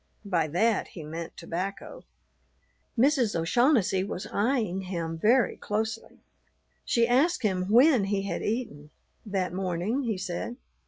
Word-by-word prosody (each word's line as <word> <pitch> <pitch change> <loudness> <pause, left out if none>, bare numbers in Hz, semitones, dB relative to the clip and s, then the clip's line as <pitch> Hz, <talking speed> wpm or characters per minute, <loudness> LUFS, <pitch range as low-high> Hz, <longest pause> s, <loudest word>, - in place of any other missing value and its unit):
By 170 -5 +1
that 205 +8 +1
he 165 - -9
meant 165 +2 -7
tobacco. 185 +4 -5 0.9
Mrs. 245 - +3
O'Shaughnessy 210 - +2
was 195 0 -5
eyeing 210 -4 0
him 170 -3 -4
very 235 +9 +3
closely. 220 +1 -4 0.6
She 235 -2 +2
asked 285 +7 +2
him 185 -3 0
when 245 -1 +5
he 195 0 -1
had 200 - -3
eaten. 210 -11 -3 0.4
That 190 -3 -1
morning, 185 +7 -1
he 225 -6 -2
said. 185 +5 -4
200 Hz, 125 wpm, -27 LUFS, 180-235 Hz, 0.9 s, when